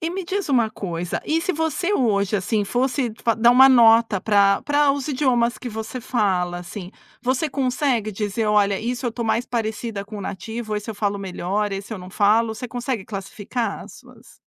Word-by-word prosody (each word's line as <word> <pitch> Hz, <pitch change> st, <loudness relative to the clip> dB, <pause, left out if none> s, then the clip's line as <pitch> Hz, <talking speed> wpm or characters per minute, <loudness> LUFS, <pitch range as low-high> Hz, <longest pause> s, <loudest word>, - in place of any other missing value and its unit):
e 330 Hz, +1 st, -2 dB
me 380 Hz, +1 st, -4 dB
diz 390 Hz, -1 st, -3 dB
uma 235 Hz, -5 st, +2 dB
coisa, 175 Hz, -4 st, -4 dB
e 320 Hz, +1 st, +1 dB
se 370 Hz, -, -1 dB
você 320 Hz, +4 st, -1 dB
hoje, 210 Hz, -, +1 dB
assim, 205 Hz, +3 st, 0 dB
fosse 250 Hz, +2 st, 0 dB
fa 230 Hz, -2 st, +2 dB
dar 235 Hz, +2 st, +5 dB
uma 265 Hz, +2 st, +8 dB
nota 230 Hz, -5 st, +5 dB
para 200 Hz, -2 st, +3 dB
para 290 Hz, 0 st, +3 dB
os 280 Hz, +1 st, -4 dB
idiomas 250 Hz, -4 st, +1 dB
que 250 Hz, -, -6 dB
você 220 Hz, +3 st, -6 dB
fala, 185 Hz, -7 st, 0 dB
assim, 180 Hz, +1 st, -8 dB, 0.3 s
você 260 Hz, +5 st, 0 dB
consegue 255 Hz, -4 st, 0 dB
dizer: 210 Hz, +2 st, -2 dB
"Olha, 205 Hz, -2 st, +3 dB
isso 245 Hz, +2 st, -3 dB
eu -, -, 0 dB
estou 235 Hz, 0 st, -4 dB
mais 225 Hz, +2 st, +1 dB
parecida 220 Hz, -3 st, -3 dB
com 210 Hz, 0 st, -8 dB
o -, -, -6 dB
nativo, 215 Hz, +3 st, -5 dB
esse 210 Hz, +1 st, -5 dB
eu 220 Hz, -, -6 dB
falo 205 Hz, -1 st, -1 dB
melhor, 195 Hz, +2 st, -2 dB
esse 195 Hz, +3 st, -5 dB
eu 210 Hz, -, -5 dB
não 180 Hz, +1 st, -10 dB
falo". 220 Hz, +3 st, +2 dB
Você 240 Hz, +2 st, -6 dB
consegue 245 Hz, -4 st, -3 dB
classificar 205 Hz, +3 st, -4 dB
as -, -, -13 dB
suas -, -, -17 dB
225 Hz, 200 wpm, -22 LUFS, 200-250 Hz, 0.3 s, uma